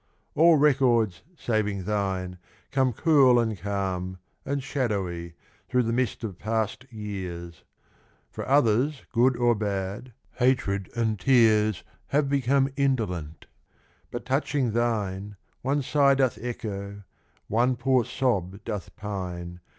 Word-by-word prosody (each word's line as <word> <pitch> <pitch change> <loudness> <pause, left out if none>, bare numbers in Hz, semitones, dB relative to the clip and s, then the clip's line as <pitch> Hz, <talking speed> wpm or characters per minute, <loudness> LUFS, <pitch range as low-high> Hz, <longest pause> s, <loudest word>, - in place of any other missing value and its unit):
All 165 +2 +6
records, 125 -9 +3 0.2
saving 105 -6 -1
thine, 95 -3 -2 0.3
come 130 -2 +2
cool, 135 -2 +5
and 110 -2 0
calm, 95 -2 -3 0.3
And 140 -1 -1
shadowy, 95 - -2 0.3
through 125 0 +2
the 115 0 -1
mist 125 0 -1
of 100 -5 -5
passed 110 +3 -2
years: 90 -6 -6 0.7
For - - -5
others, 135 +1 +2
good 125 +1 +3
or 120 0 +3
bad, 100 +2 -3 0.2
hatred 115 -7 +1
and 110 -3 0
tears 110 -5 +4 0.2
Have 140 0 +1
become 135 0 +2
indolent; 105 - -1 0.6
but 120 - -6
touching 135 -2 0
thine, 105 -4 -1 0.3
One 140 +2 0
sigh 140 0 +4
doth 130 -3 +1
echo, 100 -4 -5 0.4
one 120 +4 +2
poor 130 0 +2
sob 100 -8 -1
doth 105 -3 -5
pine. 90 -4 -5
110 Hz, 120 wpm, -26 LUFS, 100-130 Hz, 0.7 s, All